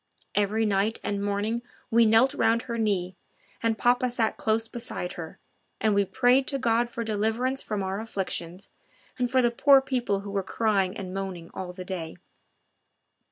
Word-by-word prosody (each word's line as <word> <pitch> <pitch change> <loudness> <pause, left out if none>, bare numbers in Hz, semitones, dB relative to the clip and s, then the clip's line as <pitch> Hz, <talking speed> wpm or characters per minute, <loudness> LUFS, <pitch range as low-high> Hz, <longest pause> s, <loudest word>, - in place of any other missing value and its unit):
Every 210 +2 +1
night 205 +2 +1
and 200 0 -2
morning 205 +3 -1 0.3
we 230 0 +5
knelt 230 +5 +5
round 230 -4 +2
her 235 -2 -4
knee 190 -4 0 0.5
and 225 -1 +1
papa 245 +2 +2
sat 235 -2 0
close 225 +1 0
beside 230 -6 -4
her, 160 -2 -8 0.4
and 215 -1 +2
we 200 0 +3
prayed 250 +6 +3
to 275 - -1
God 235 -2 +1
for 235 -1 -4
deliverance 225 +5 0
from 210 -2 -3
our 190 +1 -2
own - - -4
afflictions, 185 -3 -4 0.5
and 245 -1 +1
for 255 0 +3
the 240 - +3
poor 275 +3 +6
people 245 -7 -1
who 200 0 -7
were 200 -1 0
crying 195 -1 0
and 185 -2 -6
moaning 190 -3 -5
all 185 -1 -5
the 180 0 -8
day. 175 -4 -5
220 Hz, 175 wpm, -27 LUFS, 195-235 Hz, 0.5 s, poor